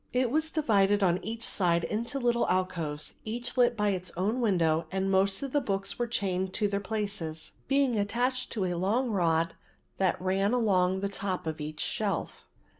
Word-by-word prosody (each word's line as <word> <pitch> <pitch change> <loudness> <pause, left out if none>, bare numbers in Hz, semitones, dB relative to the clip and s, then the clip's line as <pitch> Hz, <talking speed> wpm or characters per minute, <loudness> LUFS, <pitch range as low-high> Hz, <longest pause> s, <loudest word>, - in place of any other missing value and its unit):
It 250 -1 +2
was 315 +2 +1
divided 205 -10 +3
on 180 -1 +2
each 225 +2 -5
side 170 -5 +1
into 235 +9 -2
little 240 -2 +1
alcoves, 170 -5 -1
each 240 +3 -4
lit 245 -2 +3
by 210 -1 +2
its 185 -2 -2
own 215 +7 0
window 165 -7 +2
and 190 0 0
most 195 +4 +2
of 275 - -4
the 290 - +2
books 195 -4 -2
were 240 - +1
chained 190 -4 -1
to 210 - +2
their 200 0 -1
places, 200 -6 -4 0.2
being 270 -5 +2
attached 245 +5 0
to 205 -5 0
a 180 - -1
long 215 +8 +1
rod 165 -4 +2 0.5
that 190 -2 +2
ran 195 +3 +1
along 190 -6 +2
the 200 - 0
top 195 -3 -3
of 160 -1 -3
each 155 +1 -5
shelf. 205 -3 -2
200 Hz, 185 wpm, -29 LUFS, 185-235 Hz, 0.5 s, divided